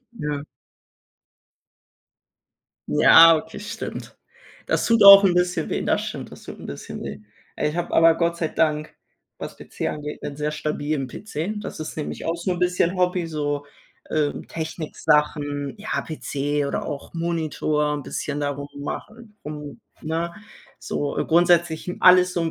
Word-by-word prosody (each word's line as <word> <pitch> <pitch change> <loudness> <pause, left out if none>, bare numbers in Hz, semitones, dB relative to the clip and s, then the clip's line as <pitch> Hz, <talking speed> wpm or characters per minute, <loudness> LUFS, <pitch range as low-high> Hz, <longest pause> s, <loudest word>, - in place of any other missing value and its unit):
Ja. 150 -8 -4 2.4
Ja, 165 0 +8
okay, 160 +4 -7
stimmt. 220 +2 -7 0.5
Das - - 0
tut 230 -2 +4
auch 200 0 +11
'n 180 -2 +4
bisschen 180 -2 0
weh. - - -1
Das - - +1
stimmt, - - -6
das - - -13
tut - - -9
'n - - -9
bisschen 70 - -7
weh. - - -7 0.4
Ich 150 +3 -1
habe 175 0 -3
aber 165 0 +6
Gott 170 0 0
sei 165 -2 -1
Dank, 155 -1 0 0.4
was - - -7
PC - - -5
angeht, 150 0 -6
'nen 140 - -5
sehr 150 0 -1
stabilen 150 -2 -2
PC. 205 +2 -5
Das 195 - -7
ist 155 - -6
nämlich 150 - -5
auch 165 - 0
so 175 +2 -2
'n 175 - -4
bisschen 180 0 +1
Hobby, 180 -1 +1
so, 145 -2 -3 0.4
äh, 150 -2 +1 0.2
Technik-Sachen, 150 -3 -1
ja 215 +2 -2
PC 145 -2 -2
oder - - -3
auch 145 -3 -6
Monitor 155 -3 -1
'n 145 - -4
bisschen 145 +2 -4
da 145 - 0
rum 140 0 -6
machen, 215 +9 -7
um 150 -1 -8 0.2
ne? 165 +2 -2 0.5
So, 145 -1 -3
äh, - - +1
grundsätzlich, 170 -1 +3
hm, 180 - -5
alles 180 0 +6
so 175 - -1
'n 165 - 0
160 Hz, 160 wpm, -23 LUFS, 150-175 Hz, 2.4 s, auch